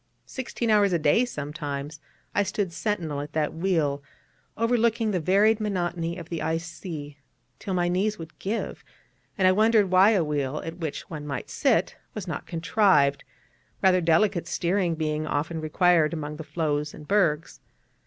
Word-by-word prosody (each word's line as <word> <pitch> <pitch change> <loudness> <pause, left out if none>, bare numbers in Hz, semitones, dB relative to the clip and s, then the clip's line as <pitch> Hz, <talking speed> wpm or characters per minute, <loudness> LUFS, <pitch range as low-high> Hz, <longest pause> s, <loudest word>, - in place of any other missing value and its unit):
Sixteen 240 -3 -3
hours 205 -3 +4
a - - +4
day 160 +10 +3
sometimes 150 - -5 0.3
I 205 - +3
stood 200 -2 -2
sentinel 170 -7 -2
at 145 +1 -8
that 155 -1 0
wheel, 160 -5 0 0.6
overlooking 230 -1 +2
the 185 - 0
varied 205 +6 +3
monotony 175 -4 -2
of 170 -2 -9
the 170 - -3
ice 165 +1 -1
sea, 155 -4 -8 0.4
till 190 - -3
my 175 -1 +1
knees 200 +4 0
would 165 0 -10
give, 210 +4 -3 0.5
and 190 -2 +4
I - - +6
wondered 215 -1 +3
why 185 +3 +7
a 190 -5 +3
wheel 145 -1 -2
at 165 +1 -6
which 160 -4 -4
one 150 -3 -7
might 135 -3 -5
sit - - +1 0.2
was - - -5
not - - -5
contrived, 165 -5 +2 0.6
rather 185 -1 +5
delicate 170 +2 +2
steering 175 -1 0
being 155 -1 -2
often 160 +3 -2
required 160 0 +3
among 150 -1 -5
the 160 - -6
floes 150 -2 -2
and 150 - -12
bergs. 170 -7 +1
170 Hz, 165 wpm, -26 LUFS, 150-195 Hz, 0.6 s, why